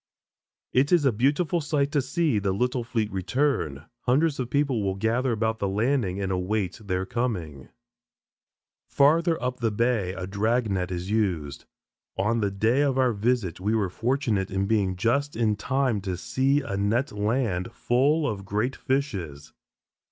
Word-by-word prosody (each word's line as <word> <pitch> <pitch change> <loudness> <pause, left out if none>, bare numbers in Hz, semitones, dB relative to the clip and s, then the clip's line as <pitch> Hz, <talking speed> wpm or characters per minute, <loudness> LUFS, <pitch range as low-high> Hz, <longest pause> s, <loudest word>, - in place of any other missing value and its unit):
It 135 +3 +3
is 170 -5 +4
a 135 - +5
beautiful 145 - +1
sight 145 -1 0
to 145 -2 +2
see 145 - 0
the 100 -1 0
little 125 +4 0
fleet 115 -2 -2
return. 95 - -1 0.2
Hundreds 145 +4 +2
of 125 -2 -2
people 140 -5 +1
will 95 -1 -1
gather 115 +6 0
about 110 0 -1
the 100 - 0
landing 105 -1 0
and 95 -1 -2
await 95 +1 -2
their 95 -2 -2
coming. 90 - -3 1.2
Farther 165 +4 +3
up 125 0 -3
the 115 -1 +1
bay, 110 -4 0
a 95 -1 -5
drag 110 +4 0
net 90 -2 -1
is 90 +2 -4
used. 90 -10 -1 0.5
On 105 +5 +1
the 105 -2 +1
day 110 +7 +1
of 140 -2 +1
our 130 -2 +3
visit 105 -5 0
we 105 +4 0
were 100 -4 +1
fortunate 115 -4 0
in 95 +1 -1
being 100 -3 +1
just 140 +9 0
in 110 -2 +1
time 125 0 0
to 95 -2 -3
see 135 +8 +1
a 130 -8 -4
net 110 +8 0
land 105 -3 -1
"full 145 +5 +1
of 100 -4 -3
great 105 +7 -1
fishes." 95 - -3
110 Hz, 165 wpm, -26 LUFS, 95-130 Hz, 1.2 s, a